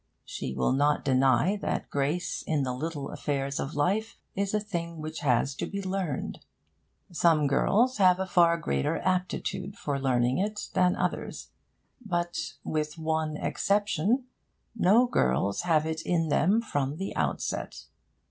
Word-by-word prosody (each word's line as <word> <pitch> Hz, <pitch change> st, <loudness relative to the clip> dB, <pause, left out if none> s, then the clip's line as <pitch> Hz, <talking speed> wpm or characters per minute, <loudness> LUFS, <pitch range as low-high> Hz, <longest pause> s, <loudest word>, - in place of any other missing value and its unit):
She -, -, -5 dB
will 65 Hz, -1 st, +1 dB
not 145 Hz, +2 st, +2 dB
deny 135 Hz, -, +3 dB
that -, -, -3 dB
grace 145 Hz, +5 st, -1 dB
in 150 Hz, -3 st, +1 dB
the 130 Hz, -1 st, -2 dB
little 145 Hz, +1 st, -4 dB
affairs 140 Hz, -1 st, -2 dB
of 135 Hz, -, -4 dB
life 205 Hz, +10 st, 0 dB, 0.2 s
is 200 Hz, 0 st, -1 dB
a 210 Hz, -, +1 dB
thing 170 Hz, -5 st, -4 dB
which 155 Hz, +1 st, -5 dB
has 135 Hz, -2 st, +2 dB
to -, -, -3 dB
be 200 Hz, -, -4 dB
learned. 190 Hz, -6 st, -3 dB, 0.7 s
Some 165 Hz, -3 st, +3 dB
girls 225 Hz, -, +2 dB
have 185 Hz, -2 st, +5 dB
a 190 Hz, -, 0 dB
far 170 Hz, -3 st, +4 dB
greater 70 Hz, -, -1 dB
aptitude 185 Hz, +1 st, -2 dB
for 140 Hz, -2 st, -2 dB
learning 125 Hz, -1 st, +1 dB
it 210 Hz, +2 st, -2 dB
than 180 Hz, 0 st, +3 dB
others; -, -, -3 dB, 0.5 s
but, 175 Hz, -6 st, -2 dB
with 150 Hz, 0 st, -2 dB
one 160 Hz, -1 st, -1 dB
exception, 205 Hz, -, +1 dB, 0.5 s
no 220 Hz, +3 st, +5 dB
girls 100 Hz, -, +1 dB
have 160 Hz, -3 st, +2 dB
it 160 Hz, 0 st, -2 dB
in 165 Hz, -2 st, 0 dB
them 195 Hz, +10 st, +3 dB
from 145 Hz, -, -1 dB
the 190 Hz, +4 st, -5 dB
outset. -, -, -2 dB
165 Hz, 150 wpm, -28 LUFS, 140-190 Hz, 0.7 s, have